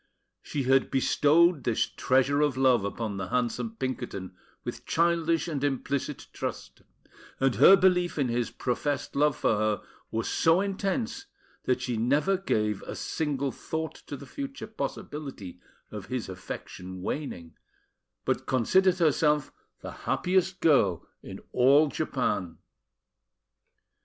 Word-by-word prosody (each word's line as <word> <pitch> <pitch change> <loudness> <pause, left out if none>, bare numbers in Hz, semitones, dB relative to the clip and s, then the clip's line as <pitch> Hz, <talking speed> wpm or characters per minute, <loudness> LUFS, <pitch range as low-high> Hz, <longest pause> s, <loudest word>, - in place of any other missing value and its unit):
She 140 - -3
had 135 +1 +3
bestowed 150 +4 +3
this 115 -3 +1
treasure 135 +3 +1
of 145 -3 +1
love 130 -5 +4
upon 100 0 -3
the 95 -1 -4
handsome 125 - -1
Pinkerton 120 - -4 0.3
with - - -6
childish 165 -1 +2
and 145 -4 -3
implicit 140 0 -2
trust; - - -6 0.6
and 135 -1 +3
her 195 - +8
belief 180 -2 +2
in 140 -3 +1
his 120 0 -1
professed 140 +4 -2
love 150 -1 +2
for 110 - +2
her 110 -1 0 0.3
was 115 +1 -2
so 165 +2 +3
intense 200 - -2 0.4
that 125 0 +1
she 120 -2 -2
never 145 - +2
gave 105 - -1
a - - -7
single 140 -3 -2
thought 160 +4 -4
to 145 - -5
the 140 - -11
future 275 - -6
possibility 140 - -6 0.3
of 105 -2 -7
his 125 -5 -3
affection 90 0 -8
waning, 90 - -5 0.7
but - - -1
considered 180 +9 +3
herself 150 -3 +2 0.3
the - - -7 0.2
happiest 185 0 +1
girl 105 - +3
in - - -9
all 140 +4 +5
Japan. 90 -7 -2
140 Hz, 130 wpm, -28 LUFS, 120-165 Hz, 0.7 s, her